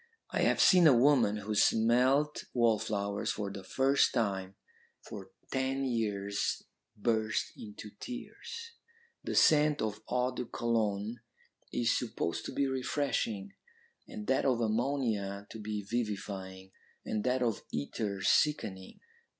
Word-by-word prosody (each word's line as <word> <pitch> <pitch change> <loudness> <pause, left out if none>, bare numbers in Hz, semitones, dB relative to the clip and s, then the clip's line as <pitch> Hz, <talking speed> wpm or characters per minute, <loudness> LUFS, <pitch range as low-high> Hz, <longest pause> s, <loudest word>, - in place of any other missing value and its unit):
I - - 0
have - - +3
seen 180 -3 +7
a 135 -5 +6
woman 125 -5 +4
who 105 +1 -4
smelt 125 +8 +3
wallflowers 105 -3 +1
for 100 -2 -4
the 100 -1 -8
first 135 +9 +2
time 100 -5 -1 0.4
for - - -9 0.2
ten 135 +1 0
years 105 -5 -1 0.3
burst 110 0 0
into 105 0 -9
tears. 460 - -7 0.5
The - - -3
scent 150 -1 +5
of 105 -1 -2
eau 125 +1 +1
de 125 - -4
Cologne 110 -1 -1 0.5
is 115 -1 +1
supposed 110 -8 -2
to - - -4
be 140 - 0
refreshing, 130 -7 -1 0.5
and 105 - -7
that 130 +3 +2
of 130 -3 +2
ammonia 110 -4 -1
to 110 - -8
be 105 -1 -4
vivifying, 95 -4 -4 0.3
and 105 -1 -2
that 125 0 +1
of 115 -3 0
ether 100 +6 -3
sickening. 95 -12 +1
110 Hz, 125 wpm, -31 LUFS, 100-130 Hz, 0.5 s, seen